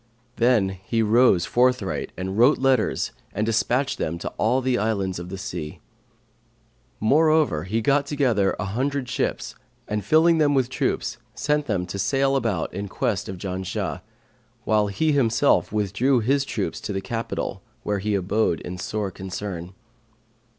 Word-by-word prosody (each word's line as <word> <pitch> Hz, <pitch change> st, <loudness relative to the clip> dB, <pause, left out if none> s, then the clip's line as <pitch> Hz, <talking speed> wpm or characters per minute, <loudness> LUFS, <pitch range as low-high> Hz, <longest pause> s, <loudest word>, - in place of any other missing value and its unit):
Then 115 Hz, -5 st, +3 dB
he 95 Hz, +4 st, -2 dB
rose 110 Hz, -5 st, +4 dB
forthright 125 Hz, -5 st, +1 dB
and 95 Hz, +2 st, -3 dB
wrote 120 Hz, +7 st, +5 dB
letters 135 Hz, -1 st, +1 dB, 0.2 s
and 105 Hz, -, 0 dB
despatched 120 Hz, +4 st, 0 dB
them 85 Hz, +2 st, -2 dB
to -, -, -4 dB
all 120 Hz, +4 st, +3 dB
the 130 Hz, -1 st, 0 dB
islands 100 Hz, -4 st, -1 dB
of 90 Hz, 0 st, -7 dB
the 95 Hz, -, -5 dB
sea. 85 Hz, -5 st, -6 dB, 1.2 s
Moreover 150 Hz, -, +3 dB
he 110 Hz, +5 st, -1 dB
got 140 Hz, +3 st, +2 dB
together 125 Hz, -10 st, +1 dB
an 105 Hz, -, -2 dB
hundred 130 Hz, +6 st, -2 dB
ships -, -, -2 dB, 0.3 s
and 105 Hz, -1 st, -2 dB
filling 160 Hz, -, +4 dB
them 145 Hz, -2 st, +3 dB
with 130 Hz, -2 st, +2 dB
troops, -, -, -2 dB, 0.2 s
sent 150 Hz, 0 st, 0 dB
them 95 Hz, -5 st, 0 dB
to 90 Hz, +3 st, -6 dB
sail 135 Hz, +7 st, +2 dB
about 110 Hz, -11 st, -1 dB
in 100 Hz, +2 st, -4 dB
quest -, -, -2 dB
of 95 Hz, -, -5 dB
Janshah, 95 Hz, +1 st, -4 dB, 0.6 s
while 105 Hz, -2 st, +2 dB
he 105 Hz, +11 st, 0 dB
himself 140 Hz, -1 st, +2 dB
withdrew 105 Hz, +6 st, +1 dB
with 115 Hz, -, -1 dB
his 140 Hz, +2 st, +2 dB
troops -, -, -3 dB
to -, -, -4 dB
his 95 Hz, 0 st, -3 dB
capital, 115 Hz, -1 st, -4 dB, 0.2 s
where 105 Hz, -1 st, -1 dB
he 105 Hz, +1 st, -1 dB
abode 95 Hz, -2 st, +1 dB
in 90 Hz, 0 st, -7 dB
sore 105 Hz, 0 st, -3 dB
concern. 95 Hz, -1 st, -6 dB
110 Hz, 155 wpm, -24 LUFS, 95-130 Hz, 1.2 s, wrote